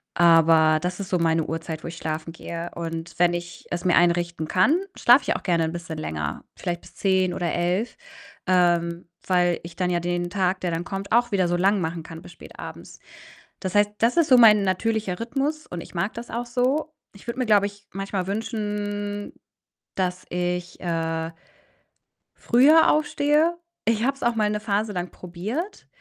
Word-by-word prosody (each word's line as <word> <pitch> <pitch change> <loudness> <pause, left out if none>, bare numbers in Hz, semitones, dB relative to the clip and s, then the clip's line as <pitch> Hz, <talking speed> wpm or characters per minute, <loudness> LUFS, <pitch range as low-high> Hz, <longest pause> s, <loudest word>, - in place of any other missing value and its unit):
Aber 165 -2 +5
das 180 +2 -3
ist 195 - -5
so 180 - +2
meine 165 -1 +2
Uhrzeit, 160 0 -5
wo - - -5
ich 165 - -7
schlafen 160 0 -4
gehe 170 0 -6
und 165 0 -5
wenn 175 0 +4
ich 175 0 -6
es 175 0 -3
mir 180 - +3
einrichten 170 -2 +2
kann, 225 - +3 0.2
schlafe 250 +3 +6
ich - - 0
auch - - -5
gerne 170 -3 +2
'n 160 - -3
bisschen 170 -2 -6
länger, 75 - -4
vielleicht 175 -1 -4
bis - - -17
10:00 190 -2 +1
oder 175 -1 -2
11:00, 180 +7 -1 0.5
ähm, 175 -2 +2 0.2
weil 175 -2 +2
ich 170 0 -10
dann 180 +1 0
ja 175 -1 +1
den 175 0 -2
Tag, 185 -1 0
der 180 - -1
dann 165 +1 -2
kommt, 195 +2 -6
auch 240 0 +3
wieder 185 -3 +2
so 175 - +1
lang 195 +2 +2
machen 165 0 -3
kann 165 0 -10
bis - - -13
spätabends. - - -11 0.6
Das 185 -2 -4
heißt, 205 0 +4
das 235 +8 +2
ist 335 -2 +4
so 255 - +8
mein 215 -3 +7
natürlicher 200 0 -1
Rhythmus 280 +6 -2
und 175 -1 -6
ich - - -13
mag 195 +5 -1
das 235 +1 -8
auch 240 +1 -3
so. 260 +6 0 0.2
Ich 200 - -16
würde 235 +2 -4
mir, 255 - +1
glaube 205 -2 +5
ich, 205 0 -14
manchmal 195 -1 -3
wünschen, 205 -1 -3 0.6
dass 185 -1 -2
ich, 180 0 -3
äh 165 -1 -2 1.1
früher 285 +7 +5
aufstehe. 305 +2 +2 0.3
Ich 225 0 +1
habe 275 +2 +2
es - - -18
auch 235 -1 +2
mal 215 -2 +1
'ne 210 0 -2
Phase 210 0 -1
lang 180 -2 -4
probiert, 210 - -6
185 Hz, 190 wpm, -24 LUFS, 170-220 Hz, 1.1 s, so